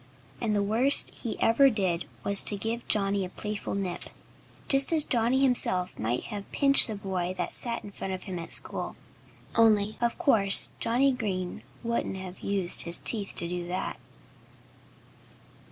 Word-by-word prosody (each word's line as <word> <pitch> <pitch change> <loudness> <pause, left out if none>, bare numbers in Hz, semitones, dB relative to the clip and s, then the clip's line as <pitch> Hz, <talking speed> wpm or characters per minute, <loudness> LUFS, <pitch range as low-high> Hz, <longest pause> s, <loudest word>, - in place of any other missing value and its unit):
And 220 -3 -2
the 205 - -1
worst 235 +7 +5
he 230 - -6
ever 270 +5 +3
did 185 -7 -3 0.2
was 200 -1 +3
to 205 - +4
give 225 +4 -6
Johnnie 200 -1 0
a 180 - -7
playful 210 +1 -6
nip, 190 -3 -6 0.6
just 275 +1 +3
as 315 -2 +2
Johnnie 245 +1 -1
himself 185 -8 0
might 115 +3 -3
have 200 -1 -9
pinched 275 -1 +5
the 220 - -6
boy 185 -2 -5
that - - -5
sat 235 -1 -1
in 205 - -11
front 195 - -7
of 185 -1 -6
him 185 -3 -7
at 165 - -9
school. - - 0 0.6
Only, 215 -2 +1
of 235 0 -2
course, 220 - +5
Johnnie 250 +4 0
Green 195 -8 -5 0.2
wouldn't 235 -4 -4
have 185 -1 -10
used 195 -3 +3
his 170 0 +2
teeth 205 -4 +1
to 170 - -3
do 175 0 -6
that. 185 +2 -5
205 Hz, 165 wpm, -26 LUFS, 185-235 Hz, 0.6 s, worst